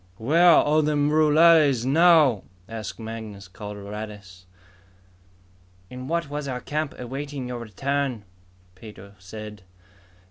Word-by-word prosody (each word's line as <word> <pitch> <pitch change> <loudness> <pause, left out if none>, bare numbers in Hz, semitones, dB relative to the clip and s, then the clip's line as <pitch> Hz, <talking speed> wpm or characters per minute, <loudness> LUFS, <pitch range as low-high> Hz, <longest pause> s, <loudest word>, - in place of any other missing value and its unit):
"Where 160 +11 +4
are 155 +1 +3
the 150 0 0
rurales 150 -2 +4
now?" 155 - +4 0.3
asked 110 -3 -7
Mangus 110 -3 -8
Coloradus. 100 -1 -9 1.4
"In 125 0 -8
what 170 +1 -2
was 145 0 -5
our 125 -2 -4
camp, 150 +2 -4
awaiting 135 +1 -6
your 125 -1 -5
return," 130 +2 -3 0.5
Pedro 100 0 -13
said. 105 +2 -10
125 Hz, 105 wpm, -24 LUFS, 105-150 Hz, 1.4 s, Where